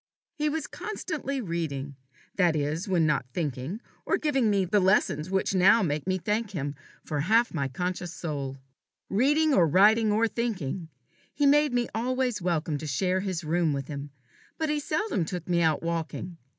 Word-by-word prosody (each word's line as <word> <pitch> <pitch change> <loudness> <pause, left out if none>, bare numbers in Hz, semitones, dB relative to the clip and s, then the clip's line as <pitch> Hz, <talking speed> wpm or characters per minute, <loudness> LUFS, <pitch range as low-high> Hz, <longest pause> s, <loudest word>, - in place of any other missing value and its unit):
He 300 0 0
was 320 +1 -2
constantly 295 -10 -4
reading 150 - -3 0.4
that 175 -4 +3
is, 155 +5 -1
when 175 -4 +2
not 150 -4 +1
thinking, 150 - -3 0.2
or - - +1
giving 270 -7 +1
me 200 -2 +2
the 205 +4 +2
lessons 185 -4 +2
which 190 +1 0
make 185 -5 +3
me 185 - +2
now 185 - -6
thank 210 +1 0
him 145 -7 -3 0.3
for 150 - -2
half 225 +10 +3
my 140 -5 -1
conscious 180 +5 -3
soul. 140 -6 -4 0.5
Reading 295 +8 +3
or 175 -9 +5
writing 210 +6 +5
or 220 +2 +3
thinking, 190 - -3 0.5
he 290 - +2
made 295 +1 +5
me 245 -1 +1
always 250 -1 -1
welcome 165 -3 -1
to 155 - -6
share 185 +6 +1
his 185 -3 -3
room 160 0 +1
with 140 -1 -4
him; 145 -1 -5 0.5
but 315 -1 -1
he 300 0 +1
seldom 310 - -1
took 170 0 -5
me 175 -1 +2
out 160 -1 +2
walking. 170 +1 -3
185 Hz, 175 wpm, -27 LUFS, 155-230 Hz, 0.5 s, or